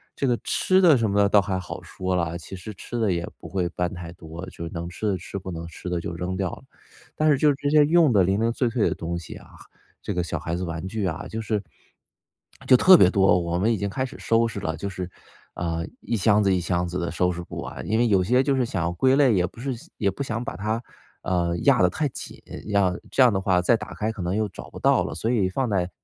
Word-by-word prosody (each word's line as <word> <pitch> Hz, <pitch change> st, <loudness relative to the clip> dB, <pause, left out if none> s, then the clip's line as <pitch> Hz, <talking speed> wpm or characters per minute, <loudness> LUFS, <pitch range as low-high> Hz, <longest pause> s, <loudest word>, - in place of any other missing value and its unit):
这 140 Hz, -, -1 dB
个 120 Hz, -2 st, +2 dB
吃 185 Hz, 0 st, +2 dB
的 165 Hz, -6 st, +6 dB
什 115 Hz, -3 st, +1 dB
么 100 Hz, -, 0 dB
的 100 Hz, -, +5 dB
倒 105 Hz, -, +5 dB
还 95 Hz, -1 st, -2 dB
好 90 Hz, -, -7 dB
说 95 Hz, 0 st, -3 dB
了， 85 Hz, -1 st, -1 dB
其 85 Hz, +3 st, -9 dB
实 105 Hz, +4 st, -8 dB
吃 120 Hz, +5 st, -6 dB
的 110 Hz, -4 st, +2 dB
也 85 Hz, 0 st, -2 dB
不 -, -, -10 dB
会 90 Hz, -3 st, -1 dB
搬 90 Hz, +1 st, -2 dB
太 85 Hz, -2 st, -7 dB
多， 85 Hz, +1 st, -9 dB
就 85 Hz, -, -7 dB
能 85 Hz, +1 st, -5 dB
吃 105 Hz, +4 st, -4 dB
的 95 Hz, -, -1 dB
吃 95 Hz, +3 st, -7 dB
不 95 Hz, -, -8 dB
能 85 Hz, 0 st, -6 dB
吃 85 Hz, +2 st, -10 dB
的 90 Hz, -, -1 dB
就 85 Hz, -, -5 dB
扔 90 Hz, +2 st, -3 dB
掉 95 Hz, -3 st, -1 dB
了。 -, -, -10 dB, 0.5 s
但 155 Hz, 0 st, +2 dB
是 140 Hz, -, +4 dB
就 145 Hz, 0 st, +4 dB
这 145 Hz, +1 st, -2 dB
些 150 Hz, 0 st, +6 dB
用 160 Hz, -2 st, +4 dB
的 100 Hz, -3 st, +5 dB
零 95 Hz, +3 st, +1 dB
零 115 Hz, +1 st, +2 dB
碎 125 Hz, -1 st, 0 dB
碎 115 Hz, -2 st, +1 dB
的 -, -, -1 dB
东 85 Hz, +1 st, -4 dB
西 85 Hz, -, -9 dB
啊， -, -, -13 dB, 0.5 s
这 -, -, -3 dB
个 90 Hz, -, 0 dB
小 80 Hz, -, -3 dB
孩 85 Hz, +2 st, -3 dB
子 90 Hz, -, -3 dB
玩 85 Hz, 0 st, -5 dB
具 105 Hz, 0 st, -3 dB
啊， 80 Hz, -4 st, -3 dB
就 110 Hz, -, -4 dB
是 105 Hz, -2 st, -2 dB, 1.0 s
就 -, -, +8 dB
特 185 Hz, +7 st, +8 dB
别 -, -, +6 dB
多。 95 Hz, -3 st, +4 dB
我 85 Hz, 0 st, -2 dB
们 110 Hz, +4 st, +2 dB
已 -, -, -1 dB
经 100 Hz, +1 st, -2 dB
开 130 Hz, +6 st, -2 dB
始 130 Hz, -, -10 dB
收 115 Hz, 0 st, +2 dB
拾 105 Hz, -3 st, -5 dB
了， 80 Hz, -3 st, -3 dB
就 100 Hz, -, -4 dB
是， 90 Hz, -2 st, -5 dB, 0.5 s
呃， 85 Hz, -1 st, -2 dB, 0.2 s
一 115 Hz, +2 st, -2 dB
箱 105 Hz, +1 st, +3 dB
子 95 Hz, -, +3 dB
一 90 Hz, -, +1 dB
箱 90 Hz, +1 st, -1 dB
子 90 Hz, +1 st, -3 dB
的 85 Hz, -, -2 dB
收 90 Hz, +1 st, +1 dB
拾 90 Hz, -, -5 dB
不 -, -, -9 dB
完， -, -, -7 dB
因 110 Hz, -, +1 dB
为 120 Hz, -, +3 dB
有 95 Hz, -2 st, +4 dB
些 125 Hz, +6 st, +3 dB
就 140 Hz, -1 st, +1 dB
是 125 Hz, -, +2 dB
想 95 Hz, -6 st, -2 dB
要 85 Hz, -, 0 dB
归 130 Hz, +9 st, +3 dB
类 140 Hz, -5 st, +4 dB
也 90 Hz, -2 st, +2 dB
不 -, -, -15 dB
是 135 Hz, 0 st, -2 dB, 0.2 s
也 100 Hz, -3 st, +1 dB
不 -, -, -8 dB
想 120 Hz, -1 st, -3 dB
把 -, -, -5 dB
它， 110 Hz, +5 st, -2 dB, 0.4 s
呃， 85 Hz, -2 st, 0 dB
压 -, -, +5 dB
得 90 Hz, -, +5 dB
太 150 Hz, -, -1 dB
紧， -, -, -8 dB, 0.3 s
样 100 Hz, -3 st, +1 dB
这 130 Hz, -, +5 dB
样 120 Hz, -, +5 dB
的 95 Hz, -, 0 dB
话 95 Hz, -2 st, +2 dB
再 115 Hz, -, +4 dB
打 -, -, -8 dB
开 110 Hz, +1 st, -1 dB
可 110 Hz, -, -7 dB
能 90 Hz, +2 st, -1 dB
又 110 Hz, 0 st, 0 dB
找 95 Hz, -, -10 dB
不 -, -, -11 dB
到 -, -, +3 dB
了。 -, -, -5 dB
所 115 Hz, -, -1 dB
以 105 Hz, -7 st, +2 dB
放 130 Hz, +7 st, -1 dB
在 90 Hz, -3 st, 0 dB
95 Hz, 295 characters per minute, -24 LUFS, 90-115 Hz, 1.0 s, 就